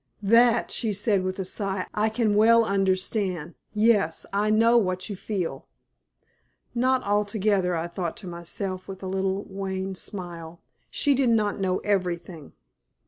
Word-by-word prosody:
"That," 230 Hz, +3 st, +4 dB
she 220 Hz, -3 st, -1 dB
said, 205 Hz, 0 st, +1 dB
with 185 Hz, 0 st, -3 dB
a 190 Hz, -, -3 dB
sigh, 195 Hz, -1 st, -2 dB
"I 215 Hz, +1 st, +1 dB
can 220 Hz, -1 st, +1 dB
well 230 Hz, +2 st, +5 dB
understand. 190 Hz, -3 st, 0 dB, 0.2 s
Yes, 210 Hz, -6 st, +2 dB
I 205 Hz, +2 st, +1 dB
know 225 Hz, +2 st, +4 dB
what 185 Hz, -3 st, +1 dB
you -, -, -3 dB
feel." 180 Hz, -8 st, -4 dB, 1.1 s
Not 255 Hz, +1 st, +2 dB
altogether, 205 Hz, -2 st, +1 dB
I 165 Hz, 0 st, -2 dB
thought 170 Hz, +1 st, -4 dB
to 210 Hz, -5 st, -9 dB
myself, 185 Hz, +2 st, -4 dB
with 195 Hz, 0 st, -8 dB
a -, -, -4 dB
little 190 Hz, +1 st, -1 dB
wan 190 Hz, 0 st, -4 dB
smile. 175 Hz, -3 st, -7 dB, 0.3 s
She 285 Hz, -, +2 dB
did 265 Hz, -2 st, +2 dB
not 215 Hz, -3 st, +1 dB
know 185 Hz, -1 st, +1 dB
everything. 180 Hz, -5 st, -2 dB
195 Hz, 145 wpm, -25 LUFS, 185-215 Hz, 1.1 s, well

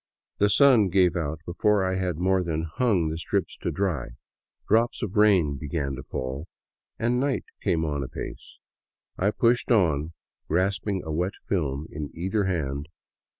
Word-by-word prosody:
The 105 Hz, -, +4 dB
sun 120 Hz, -5 st, +5 dB
gave 90 Hz, -1 st, +3 dB
out 80 Hz, -2 st, -2 dB
before 100 Hz, +3 st, +2 dB
I 95 Hz, -, 0 dB
had 90 Hz, -3 st, -1 dB
more 95 Hz, +2 st, +2 dB
than 80 Hz, -2 st, -2 dB
hung 85 Hz, 0 st, +1 dB
the 80 Hz, +1 st, -4 dB
strips 80 Hz, -, -1 dB
up -, -, -26 dB
to -, -, -1 dB
dry, 90 Hz, -11 st, -1 dB, 0.6 s
drops 115 Hz, +3 st, +2 dB
of 105 Hz, 0 st, -4 dB
rain 95 Hz, -9 st, +4 dB
began 70 Hz, -1 st, -3 dB
to 65 Hz, -, -6 dB
fall, 65 Hz, +5 st, -5 dB, 0.5 s
and 120 Hz, +2 st, +1 dB
night 135 Hz, 0 st, 0 dB, 0.2 s
came 80 Hz, -1 st, +1 dB
on 75 Hz, -2 st, -2 dB
apace. 65 Hz, -, -7 dB, 0.6 s
I 95 Hz, -, +3 dB
pushed 120 Hz, +3 st, +2 dB
on, 85 Hz, -, +2 dB, 0.3 s
grasping 95 Hz, +3 st, 0 dB
a 80 Hz, -, -5 dB
wet 90 Hz, +5 st, -1 dB
film 75 Hz, -6 st, -1 dB
in 75 Hz, -1 st, -5 dB
either 95 Hz, +4 st, 0 dB
hand. 75 Hz, -6 st, -2 dB
90 Hz, 160 wpm, -26 LUFS, 75-100 Hz, 0.6 s, sun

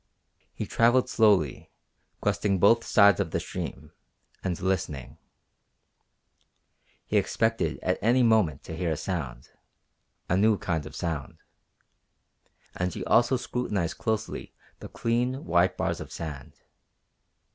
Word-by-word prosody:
He -, -, -5 dB
travelled 120 Hz, +2 st, +3 dB
slowly, 100 Hz, -, +2 dB, 0.5 s
questing 100 Hz, -2 st, +1 dB
both 115 Hz, +5 st, +4 dB
sides 100 Hz, -3 st, +5 dB
of 100 Hz, -4 st, 0 dB
the -, -, -1 dB
stream, 75 Hz, +2 st, -6 dB, 0.5 s
and 90 Hz, -3 st, -2 dB
listening. 85 Hz, -9 st, -3 dB, 1.9 s
He -, -, 0 dB
expected 115 Hz, 0 st, 0 dB
at 90 Hz, -, 0 dB
any 125 Hz, +3 st, +3 dB
moment 105 Hz, -, +2 dB
to 80 Hz, -, -7 dB
hear 85 Hz, 0 st, -2 dB
a 80 Hz, -, -1 dB
sound, 70 Hz, -11 st, -5 dB, 0.8 s
a 90 Hz, -, +1 dB
new 105 Hz, +2 st, +4 dB
kind 80 Hz, -6 st, -2 dB
of -, -, -11 dB
sound. 80 Hz, -5 st, -4 dB, 1.4 s
And 90 Hz, 0 st, -1 dB
he -, -, -6 dB
also 120 Hz, +2 st, +4 dB
scrutinized 105 Hz, -9 st, -3 dB
closely 110 Hz, -1 st, -3 dB, 0.2 s
the -, -, -8 dB
clean, 125 Hz, +3 st, -1 dB
white 85 Hz, -1 st, +2 dB
bars -, -, -1 dB
of -, -, -9 dB
sand. 75 Hz, -5 st, -7 dB
95 Hz, 125 wpm, -27 LUFS, 80-115 Hz, 1.9 s, sides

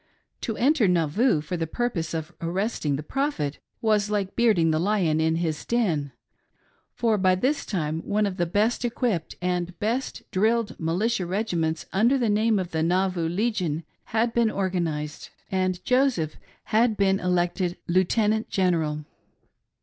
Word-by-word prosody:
To 225 Hz, -, -3 dB
enter 265 Hz, -3 st, +3 dB
Nauvoo 175 Hz, -, +2 dB
for 155 Hz, +4 st, -4 dB
the 165 Hz, -1 st, -2 dB
purpose 170 Hz, -6 st, -2 dB
of 160 Hz, +1 st, -4 dB
arresting 170 Hz, -3 st, -1 dB
the 145 Hz, -, -4 dB
Prophet 215 Hz, -, -2 dB, 0.2 s
was 210 Hz, -2 st, +2 dB
like 200 Hz, -2 st, -1 dB
bearding 210 Hz, -9 st, +3 dB
the 155 Hz, -, +1 dB
lion 175 Hz, -4 st, +1 dB
in 160 Hz, 0 st, +2 dB
his 165 Hz, -2 st, -2 dB
den; 170 Hz, -, 0 dB, 0.8 s
for 225 Hz, -3 st, +1 dB
by 185 Hz, -1 st, +4 dB
this 270 Hz, +9 st, 0 dB
time 160 Hz, -5 st, -1 dB
one 210 Hz, +5 st, 0 dB
of 195 Hz, -2 st, -3 dB
the 175 Hz, -, 0 dB
best 215 Hz, +8 st, +1 dB
equipped 235 Hz, -8 st, -1 dB
and 180 Hz, -1 st, -1 dB
best 235 Hz, +7 st, -2 dB
drilled 220 Hz, +3 st, +1 dB
militia 180 Hz, +4 st, 0 dB
regiments 170 Hz, -5 st, -1 dB
under 235 Hz, +8 st, +4 dB
the 240 Hz, -4 st, +1 dB
name 215 Hz, +1 st, +3 dB
of 185 Hz, -2 st, -3 dB
the 160 Hz, -, -1 dB
Nauvoo 180 Hz, 0 st, +1 dB
Legion 180 Hz, -5 st, -1 dB, 0.2 s
had 230 Hz, +1 st, 0 dB
been 235 Hz, -2 st, +3 dB
organised, 170 Hz, -7 st, -2 dB, 0.2 s
and 185 Hz, -1 st, -1 dB
Joseph 250 Hz, -, +2 dB, 0.3 s
had 220 Hz, 0 st, +2 dB
been 195 Hz, -1 st, +3 dB
elected 180 Hz, 0 st, 0 dB
Lieutenant 210 Hz, +5 st, +2 dB
General. 160 Hz, -5 st, 0 dB
185 Hz, 150 wpm, -25 LUFS, 165-220 Hz, 0.8 s, by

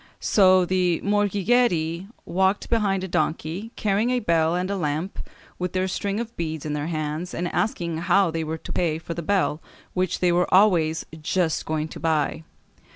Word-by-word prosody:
So 185 Hz, -2 st, +5 dB
the 180 Hz, -2 st, +1 dB
morghigeri 200 Hz, -4 st, +1 dB, 0.2 s
walked 190 Hz, +4 st, 0 dB
behind 200 Hz, -5 st, +1 dB
a -, -, -3 dB
donkey, 165 Hz, +6 st, -2 dB
carrying 210 Hz, +3 st, +1 dB
a 250 Hz, 0 st, +2 dB
bell 165 Hz, -4 st, +2 dB
and 180 Hz, +1 st, -1 dB
a -, -, 0 dB
lamp, 160 Hz, +1 st, -2 dB, 0.4 s
with 180 Hz, -1 st, -2 dB
their 185 Hz, 0 st, 0 dB
string 200 Hz, +2 st, -2 dB
of 235 Hz, 0 st, -5 dB
beads 160 Hz, -3 st, -4 dB
in 150 Hz, -, -2 dB
their 150 Hz, +1 st, -2 dB
hands, 155 Hz, +2 st, -3 dB
and 175 Hz, -, -2 dB
asking 170 Hz, -2 st, -1 dB
how 175 Hz, +1 st, +3 dB
they 165 Hz, 0 st, -2 dB
were 160 Hz, +1 st, -3 dB
to -, -, -8 dB
pay 165 Hz, -3 st, 0 dB
for 170 Hz, +1 st, -6 dB
the 170 Hz, -, -4 dB
bell, 170 Hz, -3 st, 0 dB, 0.3 s
which 185 Hz, 0 st, 0 dB
they 180 Hz, -1 st, +3 dB
were 175 Hz, +1 st, +1 dB
always 175 Hz, -5 st, +4 dB, 0.2 s
"just 165 Hz, +1 st, 0 dB
going 155 Hz, 0 st, -1 dB
to -, -, -9 dB
buy." 160 Hz, -1 st, 0 dB
175 Hz, 180 wpm, -24 LUFS, 160-195 Hz, 0.4 s, So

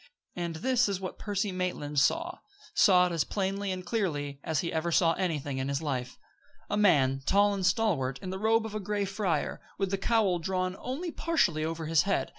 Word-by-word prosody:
And 170 Hz, -2 st, -3 dB
this 250 Hz, +6 st, +2 dB
is 195 Hz, -2 st, -2 dB
what 190 Hz, -1 st, -6 dB
Percy 205 Hz, -1 st, -1 dB
Maitland 180 Hz, -6 st, -2 dB
saw 335 Hz, -, +1 dB, 0.3 s
saw 180 Hz, -3 st, +6 dB
it 180 Hz, -, -1 dB
as 165 Hz, -2 st, +1 dB
plainly 195 Hz, 0 st, -2 dB
and 185 Hz, -1 st, -5 dB
clearly 145 Hz, -10 st, -2 dB
as 160 Hz, -3 st, 0 dB
he 170 Hz, -, -3 dB
ever 165 Hz, +1 st, -1 dB
saw 165 Hz, 0 st, +4 dB
anything 150 Hz, -7 st, -2 dB
in 130 Hz, -, -2 dB
his 140 Hz, 0 st, 0 dB
life: 130 Hz, -5 st, -3 dB, 0.5 s
A -, -, +1 dB
man, 140 Hz, -10 st, +3 dB
tall 205 Hz, +1 st, +4 dB
and 195 Hz, -1 st, -3 dB
stalwart, 180 Hz, -, +1 dB
in 185 Hz, -, -6 dB
the 190 Hz, -, -4 dB
robe 220 Hz, +1 st, +2 dB
of 220 Hz, -, -6 dB
a 215 Hz, -, -2 dB
gray 205 Hz, 0 st, -1 dB
friar, 195 Hz, -5 st, -2 dB, 0.2 s
with 195 Hz, -1 st, -1 dB
the 195 Hz, -, -1 dB
cowl 200 Hz, -4 st, +2 dB
drawn 185 Hz, +1 st, -1 dB
only 315 Hz, +7 st, -4 dB
partially 180 Hz, -, +1 dB
over 165 Hz, 0 st, -3 dB
his 160 Hz, 0 st, +3 dB
head. 200 Hz, +1 st, 0 dB
185 Hz, 205 wpm, -29 LUFS, 160-205 Hz, 0.5 s, saw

